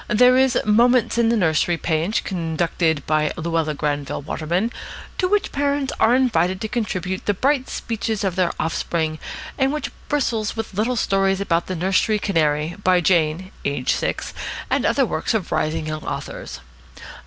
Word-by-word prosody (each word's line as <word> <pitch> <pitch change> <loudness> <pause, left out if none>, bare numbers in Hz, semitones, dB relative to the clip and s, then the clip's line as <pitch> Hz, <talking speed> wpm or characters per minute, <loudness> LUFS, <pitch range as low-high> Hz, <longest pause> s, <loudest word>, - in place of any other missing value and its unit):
There 250 +3 +5
is 260 -1 +3
a - - +1
"Moments 235 +2 +3
in 230 -1 +4
the 235 - +2
Nursery" 170 -2 +2
page, 165 +6 0
conducted 165 -3 -1
by 155 0 +1
Luella 165 -2 -1
Granville 145 -1 -2
Waterman, 175 +10 -1 0.5
to 365 - +2
which 410 +1 +1
parents 280 -1 0
are 230 +3 +5
invited 190 -8 +2
to 220 - -2
contribute 190 -5 -3
the 205 - +2
bright 270 +4 +1
speeches 220 -2 -3
of 190 -3 0
their 185 -2 +2
offspring, 160 -1 -1 0.4
and 265 0 +3
which 300 0 -3 0.2
bristles 230 -7 0
with 225 -2 -5
little 220 +6 0
stories 195 -3 +1
about 170 -4 0
the 185 - -3
nursery 190 +5 +2
canary, 160 -4 0
by 180 -1 +4
Jane 170 +1 +1
(aged 140 -2 0
six), - - -3 0.4
and - - +2
other - - +3
works - - -1
of - - -2
rising 155 +1 0
young 155 0 -4
authors. - - -6
185 Hz, 165 wpm, -22 LUFS, 160-230 Hz, 0.5 s, There